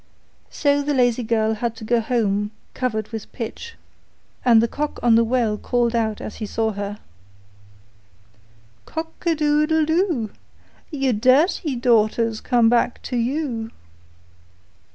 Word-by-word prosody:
So 285 -1 +1
the 285 0 -1
lazy 245 -1 +2
girl 220 -1 +1
had 230 +1 -3
to 225 - -10
go 235 +2 +2
home 210 -3 0 0.2
covered 220 -4 -2
with 225 -3 -7
pitch, 280 - -7 0.7
and 235 -3 +6
the 230 - +2
cock 295 +4 -4
on 240 -1 +5
the 230 +1 +5
well 230 -3 0
called 240 -1 0
out 220 -2 0
as - - -7
she 215 - -5
saw 220 +1 -1
her: 205 0 -5 1.9
'Cock 325 0 -5
a 330 - +3
doodle 305 +1 +2
doo! 320 - 0 0.6
Your 270 -5 0
dirty 265 - +2
daughter's 230 -2 +2
come 240 -3 +3
back 240 +1 +2
to - - -4
you. 240 -2 -2
240 Hz, 135 wpm, -22 LUFS, 220-285 Hz, 1.9 s, and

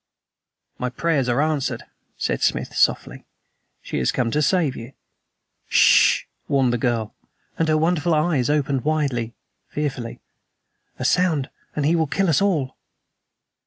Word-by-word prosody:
"My 125 - -1
prayers 140 -1 0
are 125 +5 +2
answered," 155 -3 -1 0.3
said - - -2
Smith - - -1
softly. - - +1 0.6
"She - - -3
has 65 - +1
come 120 -3 -1
to 150 - +1
save 155 -4 +1
YOU." 115 +4 -9 0.8
"S - - -6
sh!" - - +5 0.2
warned 135 -3 +2
the 120 - -1
girl, 115 -3 -1 0.5
and 165 - +2
her 155 0 +3
wonderful 165 0 +1
eyes 150 -5 +1
opened 140 -3 0
widely, 135 -7 -1 0.3
fearfully. 135 -6 -4 0.8
"A - - -4
sound 165 -7 +1 0.2
and 150 - -1
he 160 +3 +3
will 160 -2 +1
kill 195 +5 0
us 150 - +2
all." 160 -10 0
145 Hz, 145 wpm, -22 LUFS, 125-160 Hz, 0.8 s, sh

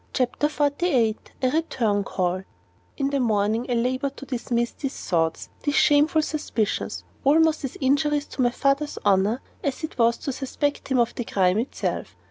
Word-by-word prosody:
CHAPTER 255 +3 +1
XLVIII 285 -6 +1 0.3
A 255 - +4
RETURN 230 -10 0
CALL 185 0 -1 0.5
In 275 -1 0
the 280 - +1
morning 220 0 +1
I 245 - +1
labored 255 +3 -1
to 275 - -8
dismiss 240 -2 -1
these 275 -2 -5
thoughts, 165 -2 -1
these 290 0 -1
shameful 300 +2 +4
suspicions, 235 -9 -2 0.2
almost 315 +2 +4
as 270 - -4
injurious 290 +2 +1
to - - -3
my 245 - +4
father's 275 +4 0
honor 205 +5 +3 0.2
as 280 +3 -2
it 315 - -6
was 235 0 +4
to 275 - -4
suspect 285 +2 -2
him 265 - +1
of 235 -1 +2
the 240 - -3
crime 190 -2 +2
itself. 240 - -3
260 Hz, 165 wpm, -24 LUFS, 230-290 Hz, 0.5 s, A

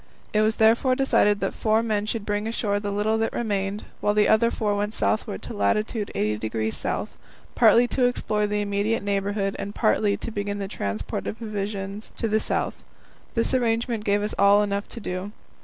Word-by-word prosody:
It 215 - +3
was 215 +1 +2
therefore 230 +4 +4
decided 210 -6 +3
that - - -1
four 220 +1 +1
men 215 -2 -1
should 220 -2 -3
bring 205 +1 -1
ashore 210 -3 0
the 205 0 -3
little 210 +2 0
that 225 - 0
remained, 205 -2 -2 0.2
while 205 - +1
the 210 0 +4
other 225 +2 +4
four 210 -3 -1
went 210 +1 -2
southward 215 -1 -1
to - - -6
lat. 205 - +2
80° 110 - -2 0.2
S., - - -11 0.4
partly 240 +1 +5
to 255 - +2
explore 210 -4 0
the 210 0 -1
immediate 205 +2 0
neighbourhood, 200 0 -1
and 200 +1 -5
partly 215 -2 +2
to - - -6
begin 205 -1 -3
the 200 -1 -3
transport 100 - -4
of 215 - -4
provisions 205 -2 -5
to 230 - -1
the 215 0 +2
south. - - -2 0.5
This 230 +2 +1
arrangement 230 -2 0
gave 205 0 +1
us 210 - -2
all 200 +1 +6
enough 200 0 -2
to 235 - -8
do. 190 0 -5
210 Hz, 190 wpm, -25 LUFS, 200-220 Hz, 0.5 s, all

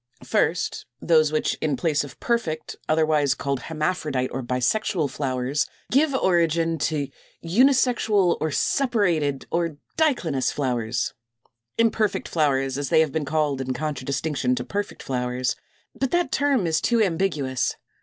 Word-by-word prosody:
First - - 0
those 155 -1 +3
which 155 - 0
in 150 -4 0
place 155 -2 +1
of 145 - -11
perfect 170 -10 -2
(otherwise 155 -3 +3
called 140 +1 -2
hermaphrodite 155 -4 -2
or 130 - -2
bisexual) 135 - 0
flowers, 130 0 -1 0.2
give 280 +1 +3
origin 165 -5 +2
to 150 -1 0 0.4
249. 200 +11 +5
=Unisexual, 225 -9 +2
or 155 - +1
Separated, 170 - +1
or 165 -3 -1 0.2
Diclinous 180 - +1
Flowers=, 120 -4 -1 0.6
imperfect 225 -2 +1
flowers, 135 -4 +1
as 140 -2 -3
they 160 - +5
have 155 -3 +1
been 155 0 -2
called 150 -2 0
in 130 -1 -3
contradistinction 140 -1 -1
to 125 - -3
perfect 205 +6 -4
flowers; 125 -1 -1 0.4
but 270 - -1
that 350 +4 +1
term 275 -8 +2
is 160 -1 +1
too 235 -1 +2
ambiguous. 155 -9 0
155 Hz, 135 wpm, -24 LUFS, 135-185 Hz, 0.6 s, 249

